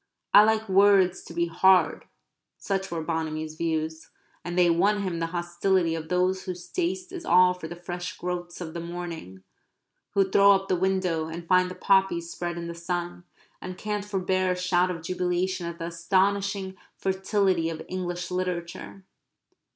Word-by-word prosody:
I 205 - +10
like 220 0 +1
words 195 -1 +4
to - - -11
be 170 0 0
hard 185 +2 +3 0.5
such 195 -1 -2
were 165 -2 -3
Bonamy's 155 -1 -3
views, 160 0 -3 0.3
and 175 +1 -5
they 180 -1 +5
won 200 +5 +2
him 175 -3 -2
the 165 - -1
hostility 175 0 0
of 160 -1 -5
those 185 +1 +1
whose 180 -1 -6
taste 365 0 -2
is 360 -3 -7
all 180 - +5
for 180 -3 -8
the 175 - -7
fresh 175 +1 -6
growths 175 -1 -5
of 160 -2 -6
the 170 - -4
morning, 170 - -7 0.7
who 195 -1 +4
throw 200 +1 +6
up 195 0 -1
the - - +3
window, 180 -3 0
and 165 +1 -7
find 185 0 +4
the 185 - -7
poppies 190 -4 +2
spread 175 -1 -4
in 170 - -5
the 170 - -5
sun, 175 +1 -4 0.4
and 185 0 -7
can't 210 -1 -3
forbear 185 -2 0
a - - 0
shout 180 0 +1
of 165 -3 -5
jubilation 180 0 -1
at 170 0 -6
the 165 - -5
astonishing 190 +3 0 0.2
fertility 190 -3 +1
of 160 -1 -6
English 180 -1 -4
literature. 180 +1 -4
180 Hz, 170 wpm, -26 LUFS, 170-190 Hz, 0.7 s, I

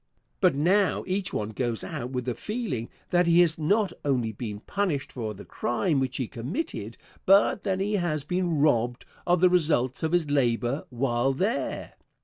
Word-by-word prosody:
But - - +4
now 185 +7 +2
each 185 0 -1
one 105 0 -2
goes 120 0 -2
out 120 - -5
with 125 -2 -3
the 125 - -1
feeling 185 - -4 0.2
that 175 -1 +3
he 170 +1 +6
has 165 -2 +3
not 200 +6 +2
only 125 -6 0
been 105 -1 -6
punished 180 - -2
for 110 -4 -4
the 100 - -11
crime 145 +4 0
which 130 -1 -1
he 130 - -2
committed, 140 - -4 0.3
but 195 +1 +4
that 190 -2 -1
he 205 +2 -1
has 155 -5 -1
been 180 0 -1
robbed 120 -5 +1 0.2
of 175 -1 +3
the 185 - +7
results 150 -8 +2
of 160 +1 -1
his 175 -3 +2
labor 130 -1 +1
while 120 +1 0
there. 200 - -2
145 Hz, 175 wpm, -27 LUFS, 120-180 Hz, 0.3 s, the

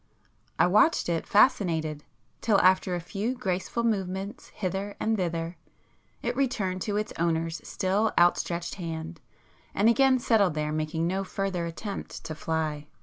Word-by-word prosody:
I - - +5
watched 210 - +4
it 165 -1 -1
fascinated, 165 - +3 0.4
till 215 -3 +3
after 185 0 +4
a - - -2
few 205 +8 -3
graceful 200 0 -2
movements 195 -2 -2
hither 195 +1 -4
and 220 0 +1
thither, 170 -3 -2 0.7
it 240 +1 -1
returned 205 -9 -1
to 205 -1 0
its 215 0 -2
owner's 165 0 0
still 200 +4 +1
outstretched 175 0 +2
hand, 165 0 -5 0.5
and 205 - +3
again 265 +2 +5
settled 210 -8 +2
there 150 0 -1
making 155 +1 -1
no 190 +3 0
further 190 -3 -2
attempt 195 +4 -6
to 155 - -5
fly. 155 -2 -2
185 Hz, 145 wpm, -27 LUFS, 165-210 Hz, 0.7 s, I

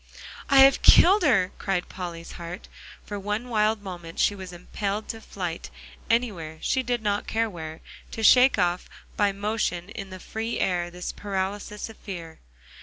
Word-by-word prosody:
"I 275 -1 +7
have 270 0 +7
killed 395 +4 +7
her!" 225 - +3
cried 190 -3 -1
Polly's 170 -2 -7
heart. 175 +3 -8 0.4
For 205 -1 -5
one 210 +5 -3
wild 215 -1 +1
moment 175 -4 -8
she - - +3
was 190 -2 -8
impelled 200 +4 -4
to 225 - -5
flight; 180 -6 -5 0.4
anywhere, 195 -10 0
she 260 - +1
did 245 -2 -2
not 205 0 0
care 225 0 +1
where, 160 -5 -8 0.3
to 225 - -5
shake 255 +4 +7
off 175 0 0 0.3
by 205 -1 +3
motion 200 -3 -2
in 195 -2 -7
the 185 0 -8
free 225 +4 -4
air 175 -2 0
this 180 +1 -5
paralysis 205 +1 -4
of 225 - -12
fear. 170 -5 -8
200 Hz, 165 wpm, -26 LUFS, 180-220 Hz, 0.4 s, I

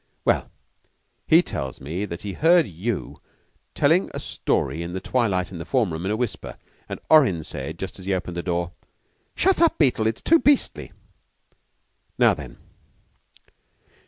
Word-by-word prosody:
"Well, - - +1 0.8
he 165 +3 +6
tells 65 - -5
me 85 +9 -4
that 85 -3 -7
he 100 -2 -4
heard 165 - +4
you 100 +6 -4 0.5
telling - - +3
a - - -3
story 75 +6 -1
in 85 +1 -5
the 95 - -3
twilight 95 -5 0
in 90 - -7
the - - -4
form 115 -8 0
room, 80 +3 -4
in 95 - 0
a - - +1
whisper. 120 -2 -4 0.3
And - - -5
Orrin 125 - +5
said, 80 +1 -6
just 95 +2 -6
as 95 - -10
he 100 - +1
opened 90 -1 -5
the 85 - -2
door, 85 -1 -2 0.6
'Shut 380 -2 +2
up, 335 - +4
Beetle; 125 -7 +2
it's 110 0 -3
too 330 +1 +5
beastly.' 290 -2 +1 1.3
Now - - +5
then?" - - -9
95 Hz, 160 wpm, -24 LUFS, 85-130 Hz, 1.3 s, he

